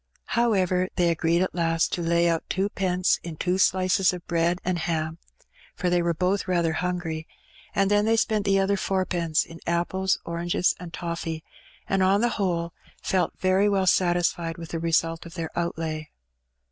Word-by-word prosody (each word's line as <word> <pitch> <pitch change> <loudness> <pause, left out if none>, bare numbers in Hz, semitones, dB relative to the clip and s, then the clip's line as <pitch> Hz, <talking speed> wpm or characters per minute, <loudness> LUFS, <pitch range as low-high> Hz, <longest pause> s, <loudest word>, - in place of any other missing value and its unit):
However, 185 -6 +2
they 175 -1 +3
agreed 165 +2 +2
at 185 - -3
last 165 -1 +1
to 175 - -1
lay 170 +1 +2
out 165 -1 -1
twopence 185 -2 +1
in 170 -2 -7
two 180 +4 -1
slices 185 0 +3
of 180 -1 -8
bread 170 +1 +1
and 180 -1 0
ham, 160 -1 -2 0.6
for 180 - -1
they 175 0 +3
were 170 -1 0
both 185 +3 0
rather 170 -3 +1
hungry; 165 -2 -3 0.5
and 195 0 +2
then 205 0 +3
they 225 +1 +3
spent 215 -2 +1
the 195 -1 +3
other 195 +1 +2
fourpence 180 -5 0
in 165 +1 -12
apples, 185 +3 +1
oranges, 170 +1 0
and 175 -2 -8
toflfee, 165 -2 -4 0.4
and, 195 0 +1
on 195 +2 +4
the 240 - +3
whole, 170 -4 -1 0.3
felt 180 -3 0
very 190 +2 +3
well 195 -2 +1
satisfied 175 -2 +1
with 165 -1 -8
the 165 - -3
result 165 0 0
of 165 - -12
their 165 -2 -4
outlay. 160 -2 -3
175 Hz, 170 wpm, -25 LUFS, 165-185 Hz, 0.6 s, on